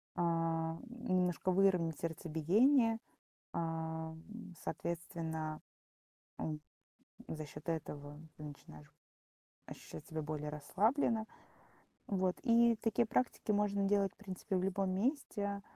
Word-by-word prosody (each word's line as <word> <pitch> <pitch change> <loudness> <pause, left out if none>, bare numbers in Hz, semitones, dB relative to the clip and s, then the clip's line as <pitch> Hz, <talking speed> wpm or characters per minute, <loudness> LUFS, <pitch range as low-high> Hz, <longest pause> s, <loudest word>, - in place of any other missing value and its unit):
э, 175 - 0
немножко 170 +4 +1
выровнять 180 -4 +3
сердцебиение. 205 - +3 0.5
Эм, 160 +4 -4
соответственно, 160 -2 -3 0.8
м, 155 -1 -2 0.7
за 155 -1 -4
счет 150 +3 -10
этого 145 -2 -3 0.2
ты 150 - -8
начинаешь 75 - -10 0.7
ощущать 80 - -9
себя 160 -1 -3
более 150 0 -3
расслабленно. 220 - +2 0.8
Вот, 185 -2 +1
и 235 -1 +6
такие 225 +2 +2
практики 235 -1 +1
можно 205 -1 +2
делать, 200 -1 +3
в - - -40
принципе, 190 -1 -3
в 180 - +1
любом 195 0 +1
месте. 200 -3 0
180 Hz, 105 wpm, -36 LUFS, 160-210 Hz, 0.8 s, и